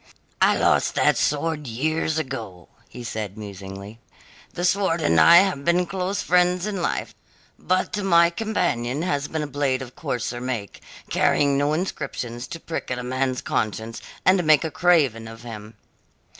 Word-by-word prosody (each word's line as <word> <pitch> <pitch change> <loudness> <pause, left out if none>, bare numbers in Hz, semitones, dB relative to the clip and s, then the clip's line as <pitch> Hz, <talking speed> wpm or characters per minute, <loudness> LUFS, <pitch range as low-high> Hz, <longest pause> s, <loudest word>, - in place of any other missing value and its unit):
"I - - +5
lost - - +2
that - - +3
sword 150 0 -1
years 155 +6 -1
ago," 115 - -5 0.3
said 110 -3 -4
he - - -11
musingly. 100 +1 -9 0.5
"The 175 - -3
sword 185 -2 +2
and 85 - +3
I 170 - +8
have 185 -8 -2
been 175 +3 +2
close 190 +2 -2
friends 180 +1 +2
in 200 -4 -3
life, - - -2 0.5
but 185 +2 0
my 170 -2 +5
companion 160 - -1
has 145 -6 -1
been 160 -1 -3
a - - -2
blade 140 -2 -1
of 125 -1 -12
coarser 120 0 -3
make, 120 -5 -5 0.3
carrying 140 -1 +2
no 145 +2 +1
inscriptions 130 -8 -4
to 165 - -7
prick 165 - -5
at 125 - -2
a 125 - -5
man's 130 0 -1
conscience 110 +1 -2 0.2
and 185 -1 +4
make 155 -2 +5
a 160 - -3
craven 145 -12 +2
of 115 +1 -11
him." 110 -2 -9
145 Hz, 160 wpm, -23 LUFS, 115-170 Hz, 0.5 s, I